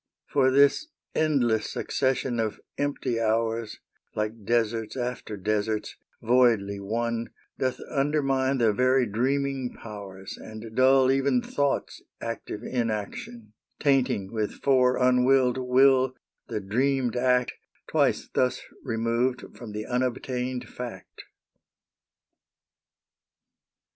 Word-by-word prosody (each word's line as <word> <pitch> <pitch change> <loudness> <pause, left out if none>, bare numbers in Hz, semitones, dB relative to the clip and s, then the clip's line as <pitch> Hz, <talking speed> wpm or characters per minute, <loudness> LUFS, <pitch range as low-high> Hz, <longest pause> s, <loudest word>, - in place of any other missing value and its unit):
For 135 -2 +3
this 140 - +4 0.3
endless 125 -8 +1
succession 130 -2 -1
of 110 -2 -1 0.2
empty 140 -4 -1
hours, 115 0 0 0.4
Like 105 0 -3
deserts 115 0 0
after 120 -4 -4
deserts, 105 +2 -1 0.3
voidly 115 -5 +3
one, 115 +3 -2 0.3
Doth 130 -1 -1
undermine 135 -2 +1
the 115 -4 +3
very 130 +3 +3
dreaming 130 +3 -1
powers 100 -3 -9
And 110 0 -9
dull 130 +1 +5
even 135 -1 +2
thought's 140 -1 -1 0.2
active 115 -1 -5
inaction, 110 -1 -4 0.3
Tainting 130 -8 +1
with 110 -2 -3
fore 130 -2 +4
unwilled 125 0 +3
will 130 0 +4 0.3
the 110 - -3
dreamed 125 +4 0
act 125 0 +2 0.3
Twice - - +1
thus 125 0 0 0.2
removed 120 +1 -1
from 115 -3 -9
the 105 +1 -5
unobtained 125 0 -2
fact. 125 -2 -9
125 Hz, 100 wpm, -26 LUFS, 110-130 Hz, 0.4 s, dull